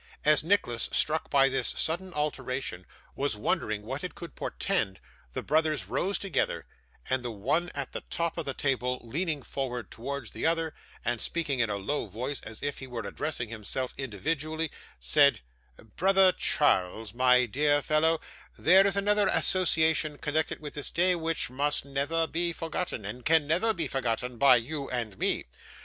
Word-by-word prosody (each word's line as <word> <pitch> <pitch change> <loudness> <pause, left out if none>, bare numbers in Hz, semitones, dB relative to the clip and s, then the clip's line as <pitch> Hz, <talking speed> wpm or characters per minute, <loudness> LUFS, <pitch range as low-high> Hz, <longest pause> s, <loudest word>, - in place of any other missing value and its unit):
As 150 -1 +5
Nicholas, 160 - +1
struck 155 +1 +2
by 135 -1 +5
this 135 0 +1
sudden 180 +4 0
alteration, 135 - -3 0.3
was 140 -6 -1
wondering 105 0 -1
what 135 +6 -5
it 180 - -5
could 170 - -9
portend, 145 - -1 0.3
the - - -4
brothers 155 -1 +1
rose 195 +2 0
together, 195 -7 -1 0.4
and 130 - 0
the 120 - -4
one 135 +11 0
at 140 -2 -4
the - - -5
top 170 -1 -1
of 165 - -3
the 135 - -2
table 125 -2 0
leaning 150 +4 -3
forward 125 -3 -4
towards 130 0 -5
the - - -7
other, 165 -1 +1 0.3
and 120 -1 -1
speaking 150 -6 -1
in 115 -3 +2
a 105 - -1
low 110 +6 -2
voice 125 +8 -4
as 110 0 -8
if 145 -1 -3
he 130 - -8
were 120 -3 -5
addressing 125 0 -3
him 110 -2 -8 0.3
individually, 155 - -3 0.3
said: 140 - +4 0.6
'Brother 190 0 +5
Charles, 110 - +1
my 125 0 +4
dear 145 +5 +2
fellow, 160 +1 +2 0.4
there 190 +3 +6
is 200 0 +1
another 205 0 +3
association 160 -5 +3
connected 155 +2 -1
with 150 -1 -8
this 145 - -4
day 180 +2 +3
which 165 -5 0
must 145 +2 +1
never 140 +4 0
be 170 +1 0
forgotten, 165 - -4
and 110 +5 -5 0.3
never 170 +8 +2
can 220 - +3
be 170 - -1
forgotten, 125 -1 -2
by 140 -2 +8
you 135 +4 -3
and 115 -6 -3
me. - - +1
145 Hz, 165 wpm, -28 LUFS, 125-165 Hz, 0.6 s, by